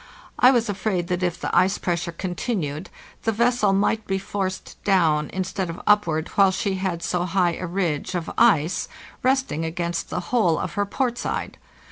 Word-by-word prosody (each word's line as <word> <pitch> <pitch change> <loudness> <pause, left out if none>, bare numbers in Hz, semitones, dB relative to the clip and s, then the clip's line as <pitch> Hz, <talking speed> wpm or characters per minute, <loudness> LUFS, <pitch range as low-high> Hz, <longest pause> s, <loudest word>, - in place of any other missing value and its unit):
I 250 - +8
was 240 -3 +3
afraid 195 -3 -1
that 180 0 -1
if 175 -1 -1
the - - -2
ice 190 +2 +4
pressure 170 -1 -2
continued 175 - -3 0.3
the 225 - +1
vessel 235 -1 +2
might 205 +2 +1
be 195 - 0
forced 190 -1 -4
down 160 -6 +2
instead 190 0 -3
of 165 - -6
upward 170 -7 +2
while 195 -1 +4
she 190 +1 -1
had 185 -3 -2
so 180 -1 0
high 180 -1 +2
a 185 - -4
ridge 175 -1 -2
of 170 -2 -2
ice 180 -8 +3 0.3
resting 260 - +1
against 170 +1 -3
the - - -2
whole 180 -10 +3
of 180 - -3
her 205 0 0
port 240 +2 -1
side. - - -4
185 Hz, 175 wpm, -23 LUFS, 170-205 Hz, 0.3 s, I